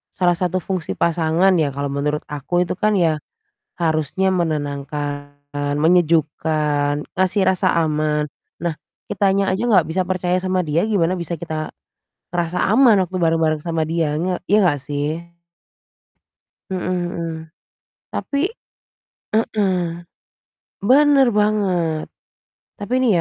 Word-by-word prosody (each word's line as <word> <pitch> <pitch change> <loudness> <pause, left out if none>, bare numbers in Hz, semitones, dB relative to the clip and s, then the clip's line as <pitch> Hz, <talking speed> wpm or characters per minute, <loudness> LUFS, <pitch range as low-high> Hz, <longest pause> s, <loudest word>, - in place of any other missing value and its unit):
salah 175 -2 +2
satu 180 0 0
fungsi 185 -3 -3
pasangan, 170 +3 +2
ya, 145 - +1
kalau 140 0 -2
menurut 150 +2 -1
aku 150 +5 0
itu - - -2
kan 215 +2 +2
ya, 160 -4 +2 0.6
harusnya 160 +3 +1
menenangkan, 145 -3 -3 0.5
menyejukkan, 155 -3 +2 0.2
ngasih 190 +2 +1
rasa 190 -1 +2
aman. 150 -1 0 0.3
Nah, 170 -2 -1 0.3
kitanya 195 -1 +1
aja 190 +4 -1
enggak 195 -8 +4
bisa 185 +3 0
percaya 180 -1 0
sama 185 0 0
dia, 155 +4 +1
gimana 185 -5 +1
bisa 170 0 -4
kita 155 -2 -4 0.6
ngerasa 175 0 -1
aman 235 -3 +6
waktu 185 +2 -6
bareng-bareng 160 -2 +2
sama 165 -1 -1
dia, 160 -2 0
nga 180 +2 -1
ya, 210 - +6
enggak, 170 -6 +3
sih? 155 +4 -4 1.3
Mhm 185 -1 -3
mhm. 175 -2 -2 0.8
Tapi 280 - -3 1.0
Heeh, 215 -3 +1 1.2
benar 280 0 +6
banget. 185 -7 +1 0.7
Tapi 205 +4 -5
nih 255 - +3
170 Hz, 120 wpm, -20 LUFS, 155-185 Hz, 1.3 s, aman